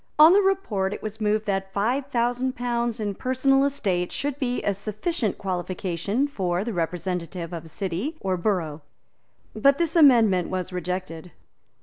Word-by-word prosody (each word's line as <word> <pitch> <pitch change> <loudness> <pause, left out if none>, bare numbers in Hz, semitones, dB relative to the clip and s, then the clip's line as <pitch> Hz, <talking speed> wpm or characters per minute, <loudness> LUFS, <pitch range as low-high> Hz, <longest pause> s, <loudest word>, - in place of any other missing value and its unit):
On 315 +3 +9
the 405 - +6
report 220 - 0
it - - -11
was 215 +1 -6
moved 215 0 +1
that 195 -1 -2
five 245 +8 0
thousand 245 0 0
pounds 240 -1 -1
in 205 -2 -2
personal 265 +4 +2
estate 190 -11 0
should 285 0 -3
be 250 -3 -1
a 200 - +1
sufficient 215 - -2
qualification 185 - -2
for 185 -8 -1
the 230 0 -4
representative 175 0 -3
of 165 -1 -6
a - - -12
city 195 - -3
or 190 -1 -1
borough. 170 -5 -1 0.7
But 275 +6 +4
this 335 0 0
amendment 230 - +5
was 185 0 -3
rejected. 180 -1 -4
210 Hz, 155 wpm, -25 LUFS, 180-255 Hz, 0.7 s, On